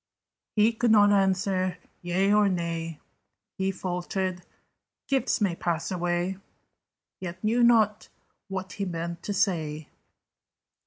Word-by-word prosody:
He 215 +2 +4
could 235 +1 +1
not 205 -2 +6
answer 190 -2 +1 0.2
yea 185 +3 +2
or 210 -1 +5
nay: 165 -3 -3 0.6
He 190 0 +1
faltered 185 0 -3 0.7
"Gifts 270 -2 +1
may 195 -5 +1
pass 170 0 -2
away." 175 +1 -1 0.8
Yet 180 +1 -7
knew 230 +3 +2
not 220 -3 +4 0.4
what 190 -1 -5
he 200 - -3
meant 170 -1 -4
to 205 - -3
say. 155 -6 -1
185 Hz, 115 wpm, -27 LUFS, 175-205 Hz, 0.8 s, not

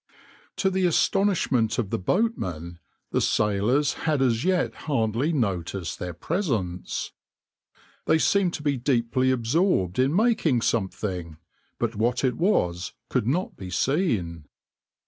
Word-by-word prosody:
\par - - -30 0.4
To 190 - +1
the 190 -1 +2
astonishment 165 - +2
of 110 -6 -2
the - - -1
boatmen 90 - -1 0.3
the - - +1
sailors 110 +8 +2 0.2
had 150 -2 +2
as 120 -3 +2
yet 185 -1 +1 0.2
hardly 115 +3 +1
noticed 95 - -2
their 90 -2 -5
presence. 95 - -2 1.0
They 160 - +5
seemed 185 +2 +2
to 150 - -7
be 145 -2 +1
deeply 130 0 +1
absorbed 125 - +1
in 135 +5 +2
making 205 - +2
something, 95 -6 -2 0.4
but 115 -1 -2
what 120 +5 0
it 125 -3 +1
was 90 - 0 0.2
could 125 -4 0
not 175 +9 -1
be 95 - -8
seen. 95 - 0
120 Hz, 130 wpm, -25 LUFS, 95-160 Hz, 1.0 s, They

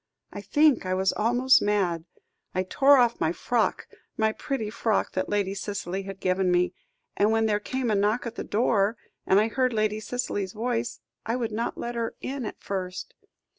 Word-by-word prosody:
I 205 - -6
think 290 +8 +3
I 185 0 -1
was 190 +1 +1
almost 245 +4 +4
mad. 185 -6 0 0.5
I 185 - +1
tore 275 +9 +5
off 240 -2 +3
my 160 - +2
frock 225 +6 0 0.3
my 220 0 +2
pretty 220 -2 -3
frock 220 -1 0
that 185 - -2
Lady 200 -2 0
Cicely 195 -2 -4
had 195 0 -8
given 185 0 +1
me, 180 0 +2 0.4
and 205 - +3
when 225 0 +2
there 210 -1 +1
came 255 +2 -2
a - - +2
knock 210 +5 +1
at 235 - -4
the - - -5
door, 210 -1 +1 0.3
and 195 - +5
I 215 - +3
heard 255 +2 0
Lady 215 -1 0
Cicely's 210 -4 -3
voice, 235 +1 -2 0.3
I 230 - 0
would 235 -3 -2
not 230 +3 -2
let 240 - -4
her 230 -1 -3
in 265 -4 -4
at - - -8
first. 185 -2 -5
215 Hz, 190 wpm, -26 LUFS, 195-235 Hz, 0.5 s, tore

